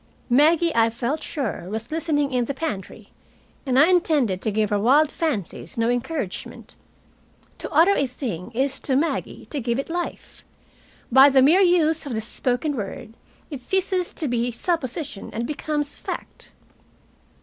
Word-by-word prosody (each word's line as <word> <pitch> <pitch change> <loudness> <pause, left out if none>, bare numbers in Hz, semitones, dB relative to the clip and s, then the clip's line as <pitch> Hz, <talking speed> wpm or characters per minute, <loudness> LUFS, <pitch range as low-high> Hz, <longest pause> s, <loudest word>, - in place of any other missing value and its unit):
Maggie, 320 +5 +4
I 230 0 +4
felt 240 +6 -3
sure, 245 - -4
was 220 +5 -5
listening 300 -4 0
in 245 -1 +1
the 280 - -4
pantry, 215 - -5 0.6
and 255 -1 +2
I 290 - +8
intended 290 - +2
to - - -1
give 215 0 0
her 205 - +2
wild 280 +8 +4
fancies 250 - -3
no 230 0 +1
encouragement. 245 - -4 0.8
To - - -4
utter 330 +6 +5
a 280 - +1
thing 235 - -5
is, 270 +2 0
to 265 - -1
Maggie, 310 +5 -1
to 295 - -2
give 235 -1 -1
it 275 +4 -4
life. 350 +1 -5 0.7
By 265 +3 +8
the 265 -1 +5
mere 330 +8 +5
use 325 -4 +3
of 250 - -3
the 220 - -1
spoken 250 +6 -1
word 220 +1 -6 0.4
it 280 -3 -6
ceases 370 +4 -1
to 310 - -3
be 240 0 0
supposition 270 - -3
and 230 +2 -2
becomes 295 +1 -3
fact. - - -7
270 Hz, 160 wpm, -23 LUFS, 235-315 Hz, 0.8 s, I